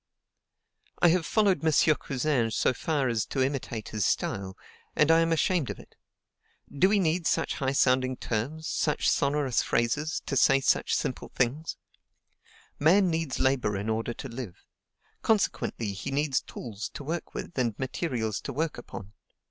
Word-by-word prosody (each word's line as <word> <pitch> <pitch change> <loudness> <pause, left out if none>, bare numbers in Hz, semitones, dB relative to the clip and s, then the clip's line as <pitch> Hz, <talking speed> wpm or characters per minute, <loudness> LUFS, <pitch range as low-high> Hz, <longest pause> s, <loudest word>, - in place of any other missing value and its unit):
I 175 - +5
have 170 -1 +1
followed 205 -6 +2
M. 155 -1 +4
Cousin 130 -3 0
so 110 - +1
far 145 -1 -1
as 115 -3 0
to 135 - 0
imitate 130 -5 -3
his 105 -2 -2
style, 95 +2 -1 0.4
and 150 +1 +4
I 165 - +6
am 165 0 +2
ashamed 165 -2 +1
of - - -4
it. - - -15 0.8
Do 185 +7 +4
we 210 - +3
need 170 -2 +1
such - - 0
high 135 -2 0
sounding 130 -1 +2
terms, 135 +9 -3
such 150 - 0
sonorous 140 -3 +2
phrases, 145 +7 0
to 140 - -2
say 135 +1 +5
such 135 - +2
simple - - -3
things? 135 +6 -1 1.0
Man 180 +5 +4
needs 160 -4 -1
to - - 0
labor 125 -7 +1
in 100 +3 -3
order 115 +1 -1
to - - -7
live; 115 -6 -8 0.6
consequently, 155 - 0
he 100 - -5
needs 140 -1 +1
tools 105 -3 -7
to - - -6
work 165 +5 -4
with - - -6
and 115 -5 0
materials 125 - -2
to - - -5
work 155 0 -2
upon. 100 -4 -9
135 Hz, 165 wpm, -28 LUFS, 120-160 Hz, 1.0 s, I